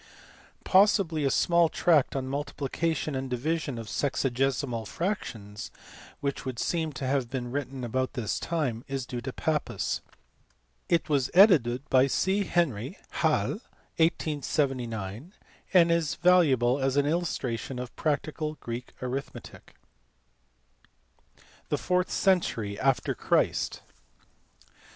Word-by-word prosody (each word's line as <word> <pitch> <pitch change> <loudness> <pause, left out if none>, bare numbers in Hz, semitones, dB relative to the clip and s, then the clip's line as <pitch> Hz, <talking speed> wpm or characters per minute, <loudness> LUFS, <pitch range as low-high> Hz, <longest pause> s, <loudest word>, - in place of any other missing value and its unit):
Possibly 185 -6 +4
a - - +3
small 170 +4 +3
tract 155 -7 +3
on 135 -1 -1
multiplication 145 +2 -2
and 130 0 -3
division 145 +2 -2
of 115 - -6
sexagesimal 130 -2 -1
fractions, 115 - -4 0.5
which 140 -1 -2
would 130 -3 -5
seem 160 +4 -1
to 130 +1 -5
have 130 -2 0
been 125 -2 -4
written 135 -1 -4
about 130 +2 -1
this 115 -5 -2
time, 135 -9 -2
is 135 -2 -3
due 125 -2 -5
to 130 - -4
Pappus. 155 +3 -1 0.9
It 170 -1 +2
was 140 -4 +1
edited 145 - +5
by 130 +1 +5
C. 195 +8 +1
Henry, 150 - 0 0.2
Halle, - - +1 0.4
1879, 135 - -1 0.4
and 170 -3 +6
is 170 -3 +1
valuable 145 -8 +4
as 135 0 0
an 145 - +4
illustration 140 -6 -2
of 125 -1 -6
practical 155 0 -2
Greek 120 -2 -7
arithmetic. 130 +2 -6 1.9
The - - +1
fourth 180 0 0
century 115 - +1
after 135 -1 +1
Christ. - - 0
140 Hz, 115 wpm, -28 LUFS, 125-165 Hz, 1.9 s, and